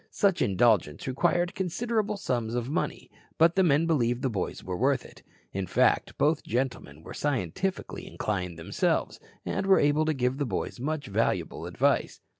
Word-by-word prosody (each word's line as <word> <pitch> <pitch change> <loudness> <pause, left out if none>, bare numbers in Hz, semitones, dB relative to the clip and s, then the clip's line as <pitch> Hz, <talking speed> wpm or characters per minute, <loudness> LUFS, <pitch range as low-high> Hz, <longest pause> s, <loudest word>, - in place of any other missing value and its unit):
Such 195 -3 +1
indulgence 100 -7 +2
required 175 +6 +1
considerable 210 +3 -1
sums 120 - -2
of 120 -1 -1
money, 160 - -3 0.3
but 165 +1 +5
the 190 - +4
men 160 -2 +4
believed 125 -6 +1
the 130 - +1
boys 100 -4 -3
were 90 - -4
worth 135 +5 +1
it. - - -14 0.3
In 95 -1 -2
fact, - - +2
both 150 +1 +2
gentlemen 120 - -3
were - - -9
scientifically 145 - -2
inclined 90 -5 -3
themselves, 80 - -1 0.3
and 195 - -2
were 195 - +6
able 145 +2 +3
to 155 - +1
give 125 +1 0
the 145 - +1
boys 100 +3 -3
much 150 +2 -2
valuable 105 +3 -1
advice. - - +1
135 Hz, 165 wpm, -28 LUFS, 110-165 Hz, 0.3 s, were